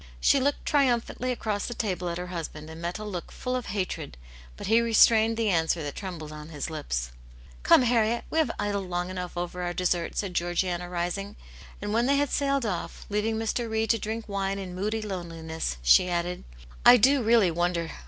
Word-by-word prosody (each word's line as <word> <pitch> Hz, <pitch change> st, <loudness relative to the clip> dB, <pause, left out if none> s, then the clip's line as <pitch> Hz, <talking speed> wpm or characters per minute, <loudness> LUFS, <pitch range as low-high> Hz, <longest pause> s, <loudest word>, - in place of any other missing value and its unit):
*' -, -, -21 dB
She 275 Hz, -, +4 dB
looked 280 Hz, +2 st, 0 dB
triumphantly 255 Hz, -2 st, +1 dB
across 215 Hz, -4 st, -2 dB
the 240 Hz, -, -5 dB
table 185 Hz, -5 st, -2 dB
at 170 Hz, -, -3 dB
her 180 Hz, -, -4 dB
husband, 155 Hz, -2 st, -6 dB
and 160 Hz, +1 st, -9 dB
met 170 Hz, +3 st, -3 dB
a 215 Hz, -, -7 dB
look 190 Hz, -5 st, -6 dB
full 250 Hz, 0 st, -3 dB
of 250 Hz, -, -3 dB
hatred, 185 Hz, -, -3 dB, 0.4 s
but -, -, -7 dB
he 225 Hz, +3 st, +4 dB
re 230 Hz, -1 st, -1 dB
strained 225 Hz, 0 st, +5 dB
the 225 Hz, -3 st, +1 dB
answer 160 Hz, -1 st, +1 dB
that 145 Hz, -1 st, -4 dB
trembled 170 Hz, -6 st, -6 dB
on 150 Hz, 0 st, -9 dB
his 150 Hz, 0 st, -5 dB
lips. -, -, -3 dB, 0.3 s
" -, -, -21 dB
Come, 255 Hz, -, +6 dB
Harriet, 235 Hz, -1 st, +2 dB
we 320 Hz, -, +1 dB
have 315 Hz, -, +2 dB
idled 200 Hz, -2 st, -2 dB
long 175 Hz, +1 st, -2 dB
enough 180 Hz, -1 st, -5 dB
over 175 Hz, +1 st, -3 dB
our 175 Hz, 0 st, -2 dB
dessert," 175 Hz, -2 st, 0 dB
said 195 Hz, -3 st, -2 dB
Georgiana, 175 Hz, 0 st, -1 dB
rising. 180 Hz, +4 st, -3 dB, 0.5 s
And 205 Hz, 0 st, -2 dB
when 235 Hz, +2 st, +2 dB
they 280 Hz, +1 st, +3 dB
had 285 Hz, -1 st, +1 dB
sailed 275 Hz, -2 st, +1 dB
off, 185 Hz, -5 st, -4 dB
leaving 210 Hz, +2 st, 0 dB
Mr. 225 Hz, +1 st, -1 dB
Reed 220 Hz, 0 st, +1 dB
to 230 Hz, -, +1 dB
drink 220 Hz, +2 st, -4 dB
wine 195 Hz, -1 st, -2 dB
in 185 Hz, -2 st, -6 dB
/woody 215 Hz, +3 st, -2 dB
loneliness, 165 Hz, -, -4 dB
she 60 Hz, -, +6 dB
added, 175 Hz, +1 st, -2 dB, 0.4 s
"I 245 Hz, +1 st, +9 dB
do 265 Hz, +4 st, +4 dB
really 225 Hz, -5 st, +4 dB
wonder. 170 Hz, 0 st, -1 dB
195 Hz, 210 wpm, -27 LUFS, 175-225 Hz, 0.5 s, I